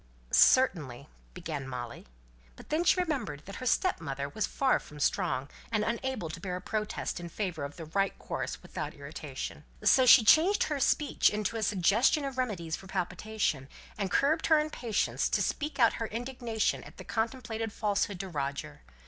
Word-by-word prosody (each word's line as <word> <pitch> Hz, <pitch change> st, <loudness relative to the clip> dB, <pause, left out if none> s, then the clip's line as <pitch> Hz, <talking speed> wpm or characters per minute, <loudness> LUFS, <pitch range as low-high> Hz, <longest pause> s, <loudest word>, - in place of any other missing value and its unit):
"Certainly, 150 Hz, -, +4 dB
" -, -, -30 dB
began 155 Hz, -6 st, -5 dB
Molly; 120 Hz, -2 st, -7 dB, 0.5 s
but -, -, -14 dB
then 315 Hz, +3 st, +1 dB
she 365 Hz, -, +4 dB
remembered 270 Hz, -, -2 dB
that 195 Hz, -, -8 dB
her 255 Hz, -, -4 dB
stepmother 140 Hz, -, 0 dB
was 210 Hz, +7 st, -1 dB
far 270 Hz, -1 st, +2 dB
from 150 Hz, -, -12 dB
strong, 135 Hz, -1 st, 0 dB, 0.2 s
and 215 Hz, -2 st, +1 dB
unable 235 Hz, -3 st, -2 dB
to 160 Hz, +1 st, -7 dB
bear 180 Hz, 0 st, -4 dB
a -, -, -3 dB
protest 210 Hz, -1 st, -3 dB
in 170 Hz, 0 st, -7 dB
favour 175 Hz, -5 st, -3 dB
of 140 Hz, +1 st, -6 dB
the 165 Hz, -, -8 dB
right 195 Hz, +5 st, 0 dB
course -, -, -5 dB
without -, -, -5 dB
irritation. -, -, -7 dB, 0.2 s
So 260 Hz, -1 st, +5 dB
she 240 Hz, -1 st, +9 dB
changed 330 Hz, -, +5 dB
her 295 Hz, -2 st, -2 dB
speech 290 Hz, +2 st, +3 dB
into 210 Hz, +1 st, -2 dB
a 225 Hz, -, -2 dB
suggestion 210 Hz, -, +3 dB
of 265 Hz, -2 st, -4 dB
remedies 175 Hz, -10 st, -2 dB
for 190 Hz, -, -12 dB
palpitation; 190 Hz, -6 st, -2 dB, 0.3 s
and 200 Hz, -2 st, -2 dB
curbed 300 Hz, -, +2 dB
her 315 Hz, -, +6 dB
impatience 255 Hz, -8 st, 0 dB
to -, -, +1 dB
speak 300 Hz, +1 st, -2 dB
out 235 Hz, -4 st, +5 dB
her 225 Hz, -, 0 dB
indignation 235 Hz, -1 st, -2 dB
at -, -, -14 dB
the -, -, -8 dB
contemplated 225 Hz, -1 st, -3 dB
falsehood 205 Hz, -2 st, -1 dB
to 195 Hz, -, -6 dB
Roger. 140 Hz, -, -4 dB
215 Hz, 175 wpm, -30 LUFS, 170-255 Hz, 0.5 s, she